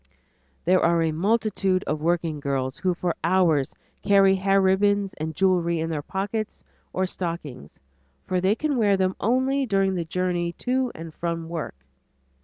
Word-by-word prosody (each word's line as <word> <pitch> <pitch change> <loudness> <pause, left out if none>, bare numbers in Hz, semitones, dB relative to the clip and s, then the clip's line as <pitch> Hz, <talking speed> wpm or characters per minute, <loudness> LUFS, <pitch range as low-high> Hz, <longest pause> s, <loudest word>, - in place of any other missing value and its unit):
There 185 +2 +4
are 170 0 +3
a 160 - +1
multitude 195 +1 +1
of 150 0 -3
working 165 -2 0
girls 135 -1 -2
who 180 -1 0
for 175 0 -2
hours 165 -6 +2 0.3
carry 195 -1 +5
hair 195 +1 +2
ribbons 195 +1 +2
and 160 0 -4
jewelry 175 -3 +2
in 165 +1 -2
their 150 -2 -2
pockets 200 +6 -4 0.3
or 185 - 0
stockings, 165 - -6 0.5
for 185 -1 -1
they 190 +3 +3
can 295 +1 -1
wear 205 -4 +3
them 185 0 0
only 260 +4 +1
during 195 -2 +2
the 175 -2 -1
journey 175 0 -1
to 255 +4 -1
and 165 0 -8
from 165 -1 -4
work. 165 - -5
185 Hz, 160 wpm, -24 LUFS, 165-195 Hz, 0.5 s, carry